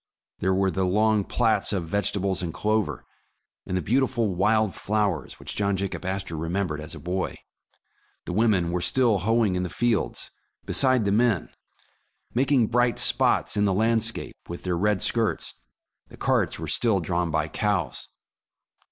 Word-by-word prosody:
There 95 +1 +1
were 95 0 +2
the 95 +3 -1
long 105 +3 +2
plats 110 -1 +1
of 95 -5 -1
vegetables 100 0 -1
and 85 -2 -3
clover, 105 - -1 0.6
and 90 - -1
the 90 - -2
beautiful 120 - +1
wild 105 +3 +2
flowers 105 -4 -2
which - - -5
John 100 -1 0
Jacob 95 -1 -4
Astor 95 -2 -3
remembered 80 -1 -2
as 75 - -6
a - - -9
boy. 90 +2 -3 0.9
The - - -4
women 95 -5 +2
were 90 0 -1
still 120 -1 +2
hoeing 110 +1 +2
in 90 - -1
the 90 - -3
fields 120 +2 -1 0.3
beside 130 -4 +3
the 100 - +1
men, 110 -4 +2 0.8
making 130 -1 +3
bright 120 0 +2
spots - - +3
in 105 0 +2
the 95 -2 +1
landscape 115 +1 +1
with 85 - -7
their 90 -2 -1
red 100 +1 +1
skirts; 115 -2 0 0.5
the - - -15
carts - - +1
were - - -6
still 110 -5 +2
drawn 85 0 -1
by - - 0
cows. - - -1
100 Hz, 160 wpm, -25 LUFS, 90-110 Hz, 0.9 s, beside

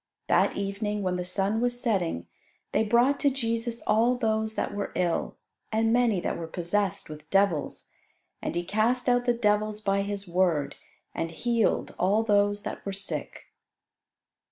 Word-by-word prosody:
That - - +2
evening, 200 +1 -2
when 185 -1 0
the 180 - -2
sun 195 +4 0
was 245 0 0
setting, 180 - 0 0.5
they - - +2
brought 240 +6 +3
to 285 - +4
Jesus 230 -2 -2
all 225 +4 +3
those 220 -2 0
that - - -2
were 205 0 -3
ill, 175 -2 -1 0.3
and 225 +1 +2
many 235 -5 +3
that - - -2
were 165 - -5
possessed 195 +3 -1
with 155 0 -10
devils. 195 -6 +1 0.6
And - - -3
He 175 - 0
cast 225 +7 +1
out 245 0 +3
the 245 - +3
devils 210 -2 +1
by 200 -2 +1
His 200 -1 -4
word, 170 -5 +1 0.4
and 165 - -2
healed 230 +7 0
all 200 +5 +3
those 205 -1 +2
that - - -6
were 200 - -3
sick. 195 +1 -5
205 Hz, 160 wpm, -27 LUFS, 190-230 Hz, 0.6 s, to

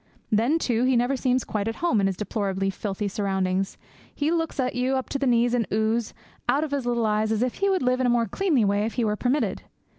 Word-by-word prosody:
Then, 230 +9 +3
too, 240 -7 0
he 260 0 +3
never 245 +3 +1
seems 255 -1 +1
quite 210 -1 -3
at 225 - -2
home 245 -12 +1
in 195 - +3
his 190 -2 -2
deplorably 195 -2 -1
filthy 200 +1 -3
surroundings; 190 -1 -1 0.4
he 300 +2 0
looks 325 -3 -1
at 255 -1 0
you, 250 +2 0
up 260 - -3
to 275 - -2
the 275 - 0
knees 240 0 +3
in 235 -5 +1
ooze, 220 +1 0 0.3
out 290 - +3
of 310 - -4
his 275 -4 -2
little 235 -1 +1
eyes 215 0 +1
as 220 +1 +1
if 250 - -1
he 395 0 +2
would 375 -5 +1
live 250 0 +2
in 255 - +2
a 240 - +3
more 235 -1 +2
cleanly 280 - +1
way 200 +1 +1
if 230 - -6
he 240 - +1
were 210 -1 +1
permitted. 255 +7 0
235 Hz, 250 wpm, -25 LUFS, 210-260 Hz, 0.4 s, Then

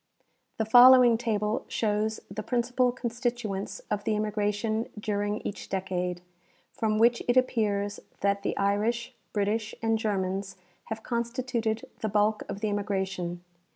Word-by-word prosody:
The 220 - 0
following 245 +1 +8
table 220 -1 -1
shows 215 0 0
the 215 - -5
principal 245 +2 +1
constituents 240 -4 -3
of 205 -1 -1
the 215 - 0
immigration 210 +1 -1
during 205 0 -1
each 200 - -6
decade, 180 -2 -2 0.5
from 215 -1 0
which 235 +2 +4
it 245 +1 +3
appears 205 -5 +1 0.2
that 200 0 +1
the - - -2
Irish, 210 +4 0 0.2
British 215 +2 -1
and 225 -1 +1
Germans 195 -2 -2 0.3
have 220 0 -6
constituted 235 -2 -2
the 220 - -1
bulk 210 +1 +2
of 200 - -5
the 215 - 0
immigration. 190 -4 -2
215 Hz, 130 wpm, -28 LUFS, 200-235 Hz, 0.5 s, following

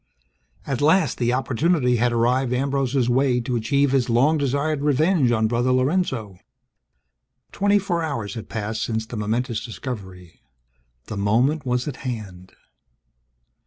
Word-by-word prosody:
At 135 -2 -3
last, 155 -1 +3
the 120 -1 +1
opportunity 130 +1 +1
had 120 +1 +2
arrived 125 +2 +1
Ambrose's 135 -1 0
way 125 0 +2
to 120 +1 -3
achieve 140 +5 +1
his 130 -3 +1
long 130 +7 +3
desired 140 +2 0
revenge 150 -1 +2
on 110 -2 +2
Brother 120 +3 +1
Lorenzo! 130 - 0 1.1
Twenty 205 +1 +2
four 185 -4 -1
hours 115 -11 -3
had 115 - -8
passed 110 0 -3
since 110 -1 -2
the 115 - -8
momentous 115 +2 -2
discovery. 95 - -8 0.6
The 105 - -6
moment 125 +9 +1
was 125 +1 0
at 140 - -5
hand. 100 -8 -7
125 Hz, 135 wpm, -23 LUFS, 115-140 Hz, 1.1 s, last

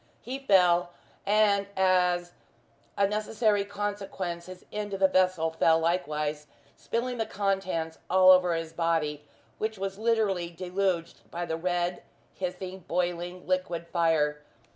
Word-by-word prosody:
He 260 +3 -5
fell, 180 -7 +3 0.3
and 200 -1 +3
as 180 -2 +2 0.7
a 200 - +4
necessary 210 0 +1
consequence 200 -4 -4
his 185 0 -11
end 205 -1 -3
of - - -6
the 190 - +6
vessel 185 -3 +2
fell 160 0 +3
likewise, 150 -3 -1 0.3
spilling 245 +1 -3
the 225 - -1
contents 190 -6 -2
all 185 0 +7
over 180 -2 +5
his 165 0 -4
body, 160 -3 0 0.4
which 220 0 -2
was 195 +1 -4
literally 215 -6 +1
deluged 180 0 -2
by 175 +1 -4
the 160 -1 -2
red, 175 +1 -1 0.3
hissing, 185 0 -5
boiling 175 +1 -2
liquid 185 -2 -1
fire. 155 -3 +1
185 Hz, 130 wpm, -28 LUFS, 170-200 Hz, 0.7 s, all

